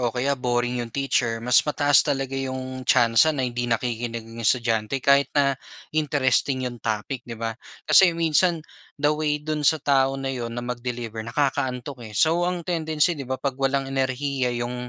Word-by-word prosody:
o 120 Hz, -, +1 dB
kaya 125 Hz, +4 st, -1 dB
boring 120 Hz, 0 st, 0 dB
'yung 120 Hz, -, -5 dB
teacher, 120 Hz, -2 st, 0 dB
mas 125 Hz, 0 st, +5 dB
mataas 145 Hz, -2 st, +3 dB
talaga 135 Hz, -1 st, -2 dB
'yung 130 Hz, -1 st, -4 dB
tsansa 120 Hz, +3 st, +5 dB
na 130 Hz, -, 0 dB
hindi 120 Hz, -1 st, -3 dB
nakikinig 115 Hz, 0 st, -2 dB
'yung 115 Hz, +1 st, -10 dB
estudyante 115 Hz, +2 st, 0 dB
kahit 140 Hz, 0 st, +4 dB
na 140 Hz, -1 st, +4 dB, 0.4 s
interesting 140 Hz, -3 st, +1 dB
'yung 120 Hz, -2 st, -6 dB
topic, 115 Hz, +4 st, -4 dB
'di 115 Hz, -, -6 dB
ba? 115 Hz, 0 st, -3 dB, 0.3 s
Kasi 175 Hz, -3 st, +6 dB
minsan 165 Hz, 0 st, +2 dB, 0.3 s
the 145 Hz, +1 st, +2 dB
way 150 Hz, -1 st, 0 dB
dun 150 Hz, 0 st, -4 dB
sa 150 Hz, +2 st, +4 dB
tao 135 Hz, -1 st, +2 dB
na 135 Hz, 0 st, -3 dB
'yon 120 Hz, -2 st, -5 dB
na 120 Hz, -, -4 dB
mag-deliver 120 Hz, -2 st, -5 dB
nakakaantok, 125 Hz, 0 st, -2 dB
eh, 105 Hz, -, -9 dB
so 165 Hz, +6 st, +3 dB
ang 175 Hz, -2 st, -3 dB
tendency, 160 Hz, -1 st, 0 dB
'di 140 Hz, -5 st, -7 dB
ba, 130 Hz, -, -1 dB
'pag 140 Hz, 0 st, -2 dB
walang 135 Hz, 0 st, +1 dB
enerhiya 135 Hz, 0 st, -1 dB
'yung 125 Hz, +1 st, -4 dB
130 Hz, 175 wpm, -24 LUFS, 120-145 Hz, 0.4 s, Kasi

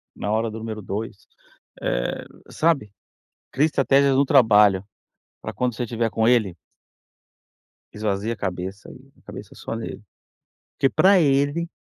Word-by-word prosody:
na 105 Hz, -, -4 dB
hora 110 Hz, +1 st, 0 dB
do 110 Hz, -, -7 dB
número 110 Hz, -1 st, -6 dB
2. 105 Hz, +3 st, -6 dB, 0.5 s
Eh, -, -, -2 dB, 0.2 s
sabe? 155 Hz, -11 st, 0 dB, 0.6 s
Crie 145 Hz, +4 st, +3 dB
estratégias 140 Hz, -2 st, +3 dB
no 140 Hz, -, +4 dB
trabalho 105 Hz, -8 st, +4 dB, 0.6 s
para -, -, -5 dB
quando 125 Hz, -2 st, -2 dB
você 120 Hz, -, -3 dB
estiver 115 Hz, 0 st, -2 dB
com 110 Hz, 0 st, 0 dB
ele 110 Hz, -8 st, +2 dB, 1.4 s
esvazie 105 Hz, +1 st, -2 dB
a -, -, -6 dB
cabeça 95 Hz, 0 st, -5 dB
aí, -, -, -15 dB
a -, -, -28 dB
cabeça -, -, -11 dB
só -, -, -6 dB
nele. 115 Hz, -2 st, -7 dB, 0.8 s
Porque 135 Hz, -, +3 dB
pra 190 Hz, +7 st, +4 dB
ele 145 Hz, +3 st, +1 dB
115 Hz, 140 wpm, -23 LUFS, 105-135 Hz, 1.4 s, no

